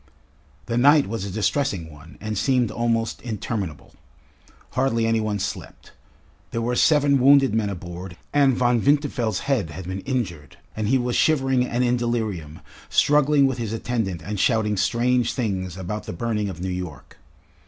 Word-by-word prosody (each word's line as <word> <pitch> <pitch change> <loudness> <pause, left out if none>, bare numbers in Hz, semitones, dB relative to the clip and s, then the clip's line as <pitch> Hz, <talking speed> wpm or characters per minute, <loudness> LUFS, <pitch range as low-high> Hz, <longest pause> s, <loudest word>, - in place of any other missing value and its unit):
The 115 0 -1
night 145 +3 +6
was 110 -1 -4
a - - -4
distressing 105 - -1
one 75 +3 -14
and 110 0 -4
seemed 125 +2 +1
almost 115 -1 -1
interminable. 105 - -5 0.8
Hardly 120 -3 +1
any 115 0 +2
one 110 -1 -1
slept. 100 0 -6 0.6
There 115 - -3
were 120 +1 0
seven 145 -1 +4
wounded 135 -2 +5
men 110 -2 +1
aboard, 90 -1 -7 0.2
and 140 -3 +4
Von 120 -2 +2
Winterfeld's 135 -7 +1
head 125 - 0
had 80 +4 -8
been 95 +2 -4
injured, 95 - -4 0.2
and 110 -1 -2
he 135 +4 +3
was 125 -1 -1
shivering 135 -5 +2
and 120 +1 0
in 125 0 +2
delirium, 110 -10 -3 0.3
struggling 145 -1 +4
with 130 -2 -1
his 115 -2 -3
attendant 110 -7 -2
and 105 0 -4
shouting 110 -1 +2
strange 120 +4 +1
things 95 -7 -3
about 100 +3 -5
the - - -5
burning 105 +1 -2
of 85 -2 -8
New 95 - -2
York. 90 -6 -7
115 Hz, 165 wpm, -23 LUFS, 95-125 Hz, 0.8 s, night